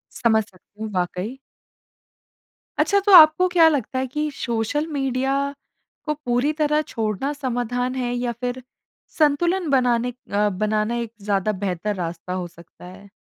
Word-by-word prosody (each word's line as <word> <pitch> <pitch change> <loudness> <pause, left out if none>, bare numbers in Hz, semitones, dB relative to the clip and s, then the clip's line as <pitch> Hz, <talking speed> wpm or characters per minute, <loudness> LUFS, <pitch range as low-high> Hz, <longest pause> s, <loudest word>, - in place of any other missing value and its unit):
समझ 220 -3 +2
सकती 205 +2 -21
हूँ 215 - -5
वाक़ई। 180 +7 -3 1.4
अच्छा 400 0 +3
तो 400 0 +1
आपको 320 +2 +8
क्या 340 -2 +5
लगता 260 -3 -2
है 260 - -2
कि 300 0 0
सोशल 240 +6 -2
मीडिया 270 0 0 0.7
को 300 - 0
पूरी 275 -1 0
तरह 300 0 +1
छोड़ना 225 +5 -2
समाधान 245 -2 -2
है 245 -1 -2
या 245 0 -1
फिर 250 +1 -3 0.6
संतुलन 335 +3 +2
बनाने 245 -2 +2 0.2
अ, 205 +1 +2
बनाना 215 +3 -1
एक 235 -2 -4
ज़्यादा 200 0 0
बेहतर 195 +3 -2
रास्ता 175 0 -5
हो 180 -1 -3
सकता 170 +1 -16
है? 195 +2 -13
245 Hz, 145 wpm, -22 LUFS, 210-290 Hz, 1.4 s, आपको